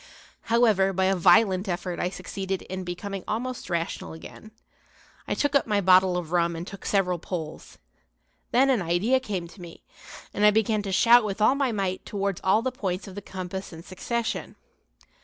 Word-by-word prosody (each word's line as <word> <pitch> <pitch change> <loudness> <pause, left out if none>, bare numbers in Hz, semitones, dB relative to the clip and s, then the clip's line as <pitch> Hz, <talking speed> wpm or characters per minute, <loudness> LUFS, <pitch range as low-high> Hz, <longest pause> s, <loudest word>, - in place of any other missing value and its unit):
However, 215 -5 +3
by 190 +1 +1
a 190 +1 +2
violent 185 +2 +4
effort 175 0 -3
I 180 - 0
succeeded 190 +1 -5
in 185 0 -6
becoming 190 +2 -5
almost 245 +2 -4
rational 170 -2 -3
again. 165 +6 -11 0.8
I - - -1
took 290 -1 0
up 280 -4 +3
my 210 -2 +2
bottle 185 -1 +4
of 170 -2 -5
rum 170 -1 +1
and 165 +1 -5
took 195 -1 -9
several 180 -3 +1
pulls. 160 -3 -7 0.7
Then 270 +3 +4
an 245 -6 +1
idea 175 +10 +2
came 195 -9 -4
to 185 - -15
me, 170 -1 -11 0.5
and 205 - -1
I 210 - +8
began 215 0 +1
to 200 -1 -5
shout 235 +5 +6
with 205 -1 -4
all 215 +5 +5
my 275 -3 0
might 195 -3 -2
towards 200 -2 -3
all 210 +4 +3
the 260 - -1
points 195 -5 -4
of 195 - -9
the 205 - -7
compass 190 0 -6
in 165 0 -10
succession. 235 +6 -4
195 Hz, 185 wpm, -26 LUFS, 180-215 Hz, 0.8 s, I